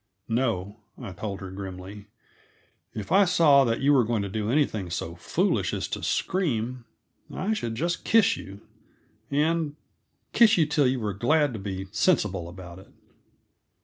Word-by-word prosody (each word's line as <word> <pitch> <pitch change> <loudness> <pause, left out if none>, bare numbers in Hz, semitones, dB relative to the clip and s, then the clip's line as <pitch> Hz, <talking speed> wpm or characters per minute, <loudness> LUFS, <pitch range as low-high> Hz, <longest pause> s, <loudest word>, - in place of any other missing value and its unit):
"No," 115 -4 -1 0.2
I - - -7
told 100 +2 -6
her 95 -1 -7
grimly. 95 +1 -8 0.9
"If 105 -2 -6
I 200 +1 +6
saw 150 -6 +5
that 115 -1 -1
you 145 +2 +4
were 130 -3 +5
going 110 -2 -1
to 100 - -4
do 105 +1 -3
anything 115 -9 0
so 85 -1 -4
foolish 85 - 0
as - - -3
to - - -4
scream, 125 - -1 0.5
I 205 +4 -1
should 115 - -3
just 170 +7 -2
kiss 225 -3 +4
you, 100 +1 -10 0.7
and 150 +1 0 0.6
kiss 225 -3 +6
you 160 - +4
till 150 -2 +2
you 130 0 0
were 105 -3 -2
glad 145 - +2
to 110 - -5
be 95 -1 -5
sensible 105 - +1
about 90 0 -10
it." 95 - -16
115 Hz, 160 wpm, -26 LUFS, 95-150 Hz, 0.9 s, I